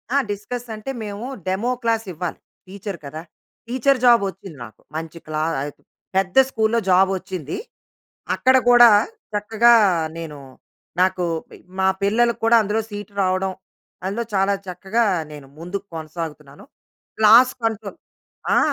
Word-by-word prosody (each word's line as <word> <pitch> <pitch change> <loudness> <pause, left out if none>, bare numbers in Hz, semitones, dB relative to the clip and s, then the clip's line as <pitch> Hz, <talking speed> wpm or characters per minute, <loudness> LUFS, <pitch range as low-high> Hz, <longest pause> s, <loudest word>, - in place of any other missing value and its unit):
ఆ! - - +5
డిస్కస్ 235 +4 -5
అంటే 215 +5 -6
మేము 205 +2 -6 0.2
డెమో 205 +7 0
క్లాస్ 225 -1 +1
ఇవ్వాలి 170 +1 -5 0.3
టీచర్ 200 0 -7
కదా! 155 +3 -7 0.5
టీచర్ 260 +2 +2
జాబ్ 235 -3 +7
వచ్చింది 190 -5 -11
నాకు. 110 - -16
మంచి 165 +1 -6
క్లా 155 0 -2 0.2
ఆహ్, 145 +1 -4 0.4
పెద్ద 190 -1 0
స్కూల్‌లో 225 -1 +1
జాబ్ 190 +1 +5
వచ్చింది. 185 -5 -6 0.8
అక్కడ 260 0 +4
కూడా 240 -1 +9 0.4
చక్కగా 220 +3 +4 0.4
నేను 155 -3 -7 0.6
నాకు 185 -1 +2 0.3
పి - - -13 0.2
మా 190 - +3
పిల్లలకు 235 +4 +2
కూడా 230 0 +6
అందులో 215 +2 -1
సీట్ 205 -1 -7
రావడం. 185 0 0 0.5
అందులో 210 +5 -2
చాలా 195 +1 +2
చక్కగా 200 +6 -1 0.3
నేను 145 -2 -11
ముందుకు 190 +4 -5
కొనసాగుతున్నాను. 155 - -7 0.5
క్లాస్ 230 +4 +7
కంట్రోల్ 220 -3 -3 0.6
ఆ! - - +6
200 Hz, 130 wpm, -21 LUFS, 180-225 Hz, 0.8 s, కూడా